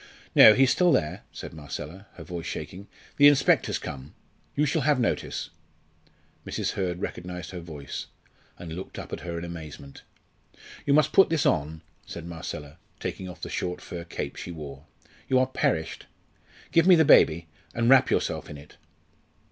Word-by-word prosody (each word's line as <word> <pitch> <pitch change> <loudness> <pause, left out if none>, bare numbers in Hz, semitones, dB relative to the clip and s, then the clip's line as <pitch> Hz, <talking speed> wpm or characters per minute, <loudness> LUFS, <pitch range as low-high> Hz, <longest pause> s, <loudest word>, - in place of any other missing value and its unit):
"No, 110 - +9
he's 135 -1 +4
still 180 +6 +4
there," 75 - 0
said - - -8
Marcella, 80 +5 -8
her - - -9
voice 85 -2 -6
shaking. 100 +3 -6 0.3
"The 145 - +8
inspector's 140 -2 +3
come. 70 +1 -8 0.4
You 150 - +2
shall 150 +2 0
have 145 -1 +2
notice." 120 - -2 0.9
Mrs. - - -2
Hurd 90 -2 -3
recognised 90 -1 -6
her 90 - -6
voice, 75 -5 -7 0.5
and 85 -2 -8
looked 90 +3 -8
up - - -8
at - - -4
her 85 0 -5
in 85 - -5
amazement. 80 -5 -9 0.9
"You 140 - +5
must 155 0 +3
put 195 - +6
this 165 -3 +1
on," 80 +1 0 0.2
said 85 - -8
Marcella, 80 -3 -7 0.2
taking 95 -1 -5
off 90 - -11
the - - -5
short 90 0 -3
fur 85 -1 -7
cape 85 - -6
she - - -7
wore. 75 -4 -8 0.4
"You 130 - +4
are 130 - +4
perished. 80 -10 -2 0.6
Give 165 +1 +4
me 185 - +9
the 160 -1 +5
baby, 85 - +5 0.3
and 115 0 +1
wrap 135 0 +6
yourself - - -1
in 75 - -8
it." 70 +1 -15
90 Hz, 170 wpm, -26 LUFS, 80-130 Hz, 0.9 s, No